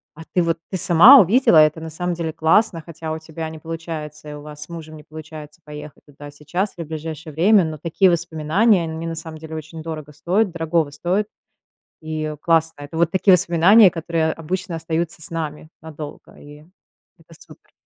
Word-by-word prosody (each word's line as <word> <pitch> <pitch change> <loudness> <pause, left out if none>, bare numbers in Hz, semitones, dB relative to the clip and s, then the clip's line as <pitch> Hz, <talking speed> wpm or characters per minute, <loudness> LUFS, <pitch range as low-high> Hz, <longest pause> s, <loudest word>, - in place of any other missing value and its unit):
А 165 - -12
ты 180 - +3
вот, 170 0 0
ты 185 - -2
сама 185 +11 +8
увидела, 210 0 +4
это, 155 +1 +5
на 160 0 -7
самом 175 +3 -3
деле, 165 -1 -3
классно, 165 +2 +2
хотя 160 -1 -7
у 160 - -4
тебя 160 0 -7
не 160 -1 -10
получается, 160 -2 -7
и 150 - -7
у 150 - -9
вас 150 0 -8
с 150 - -14
мужем 160 -2 -9
не 150 - -13
получается 155 -1 -11
поехать 150 -1 -11
туда 145 0 -12
сейчас 155 +8 -3
или 170 - -5
в - - -18
ближайшее 160 -1 -7
время, 195 +5 +4
но 160 -1 -4
такие 170 +5 +2
воспоминания 170 +4 +1
они 160 0 -5
на 165 0 -4
самом 160 -1 -7
деле 160 0 -9
очень 160 +1 -8
дорого 155 -2 -7
стоят 180 +7 0
дорогого 165 -2 -1
стоят 180 +8 -1 0.7
и, 155 -1 -4
э, 155 -1 -4
классно. 160 -1 0
Это 160 +3 -8
вот 170 0 +2
такие 190 0 +4
воспоминания, 180 +3 +5
которые 165 -1 -1
обычно 180 +2 -4
остаются 165 0 -3
с - - -4
нами 155 -2 -5
надолго. 155 -2 -10
И 150 +1 -14 0.5
это - - -19
супер. - - -18
160 Hz, 195 wpm, -21 LUFS, 155-170 Hz, 0.7 s, сама